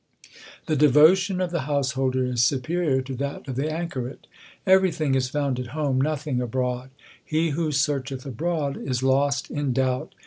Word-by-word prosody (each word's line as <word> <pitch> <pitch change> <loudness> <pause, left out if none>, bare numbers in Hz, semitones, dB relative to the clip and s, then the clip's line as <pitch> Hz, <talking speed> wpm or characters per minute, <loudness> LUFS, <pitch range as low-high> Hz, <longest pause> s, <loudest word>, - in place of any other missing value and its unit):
The 155 - 0
devotion 155 +7 +5
of 180 -2 -1
the 170 - -1
householder 130 -2 0
is 125 -2 0
superior 135 +3 +1
to 130 0 -6
that 140 +1 -4
of 130 - -4
the 145 +4 -1
anchoret: 155 -6 -5 0.4
Everything 185 -7 +3
is 130 -1 +1
found 140 -3 -1
at 125 - -4
home, 140 -4 +1
nothing 145 -3 -1
abroad: 125 +1 -2 0.3
He 160 +1 0
who 155 +1 -1
searcheth 140 -2 -1
abroad 145 +2 -2
is 130 -1 -3
lost 140 +1 +1
in 145 -3 -1
doubt. 130 0 -1
140 Hz, 160 wpm, -24 LUFS, 130-155 Hz, 0.4 s, devotion